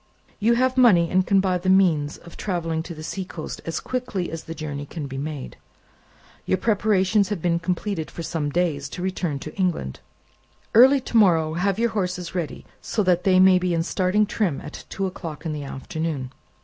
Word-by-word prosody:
"You 225 +3 +3
have 255 +1 +1
money, 185 -10 +5
and 185 0 +2
can 195 - +4
buy 185 -2 +1
the 185 +2 -1
means 170 -6 +3
of 170 0 -14
travelling 165 -5 -2
to 170 +1 -8
the 155 - -9
seacoast 180 -1 -6
as 165 - -2
quickly 245 -8 -3
as 165 0 -6
the 165 - -6
journey 145 -2 -5
can 155 -1 -6
be 135 -1 -6
made. 145 -2 -6 0.9
Your 185 - +2
preparations 205 -1 +2
have 205 -4 -2
been 170 0 +1
completed 180 0 -2
for 170 - -7
some 160 -3 -2
days, 145 -4 -1
to 180 - -4
return 180 -5 -2
to 155 +3 -8
England. 175 - -1 0.7
Early 265 +4 +7
to 235 - -1
morrow 165 -7 +4
have 190 +3 0
your 235 0 +1
horses 180 -4 -3
ready, 175 -4 -4 0.2
so 215 - -1
that 180 -1 +2
they 185 -1 +5
may 185 -1 +6
be 180 -1 0
in 165 - +1
starting 185 +4 +1
trim 195 -8 -1
at 150 - -9
two 195 - -2
o'clock 165 -4 -6
in 160 - -2
the 145 -1 -5
afternoon." 140 0 -4
180 Hz, 195 wpm, -24 LUFS, 160-195 Hz, 0.9 s, Early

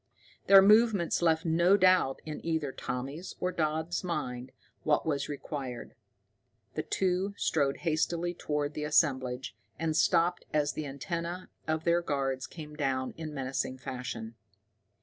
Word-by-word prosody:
Their 195 -1 +9
movements 210 -4 +4
left 165 0 +2
no 170 +4 +4
doubt 185 -8 +3
in 155 -1 -6
either 160 -4 -1
Tommy's 135 +8 -5
or 180 - 0
Dodd's 160 +2 -1
mind 130 -8 -3 0.3
what 150 - +1
was 145 -3 -1
required. 140 -4 -5 0.8
The - - -1
two 190 +1 0
strode 140 -3 +1
hastily 170 +2 0
toward 150 -3 -2
the 150 - -4
assemblage, 130 -4 +1 0.2
and 160 -1 -1
stopped 175 +2 +3
as 145 -1 +2
the 155 - -4
antenna 170 +6 -4 0.2
of 160 0 0
their 170 +1 +3
guards 135 -4 -2
came 150 -2 -9
down 135 -3 -1
in 160 -1 -6
menacing 130 -2 -3
fashion. 125 -3 -6
155 Hz, 135 wpm, -30 LUFS, 135-170 Hz, 0.8 s, Their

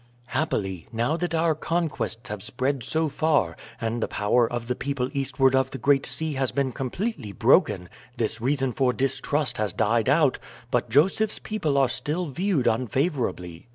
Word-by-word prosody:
"Happily, 95 - -2
now 120 +6 0
that 170 -1 -2
our 165 0 +3
conquests 150 - -2
have 105 -2 -5
spread 130 +6 -1
so 160 +6 0
far, 145 - +1 0.2
and 115 +1 -2
the - - 0
power 115 +3 +1
of 120 -1 -4
the 125 - +1
people 135 -1 -3
eastward 135 -1 +2
of 130 0 +2
the 135 - -6
Great 140 0 +3
Sea 160 -1 0
has 135 -2 -1
been 140 -2 0
completely 135 - -3
broken, 90 -1 +3 0.3
this 115 0 -1
reason 135 +1 +1
for 125 +1 +1
distrust 135 0 0
has 105 -3 -1
died 115 +2 +1
out, 145 -2 +3 0.3
but 120 -2 0
Joseph's 190 - +3
people 160 -10 -1
are 135 -1 +4
still 160 +8 -1
viewed 165 -1 0
unfavorably. 120 - -1
130 Hz, 165 wpm, -25 LUFS, 115-150 Hz, 0.3 s, are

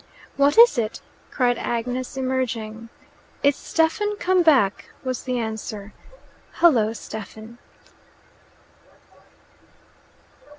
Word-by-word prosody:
"What 280 +4 +3
is 465 - +7
it?" 220 -1 -3 0.3
cried 245 -3 +1
Agnes, 250 +3 -3
emerging. 230 -4 -3 0.5
"It's 285 -1 +4
Stephen 415 +6 0
come 370 -2 +2
back," 265 - +3 0.2
was 255 -1 -4
the 255 -1 -1
answer. 220 -2 -5 0.6
"Hullo, 235 -11 +3
Stephen!" 220 +2 -9
250 Hz, 85 wpm, -23 LUFS, 220-280 Hz, 0.6 s, is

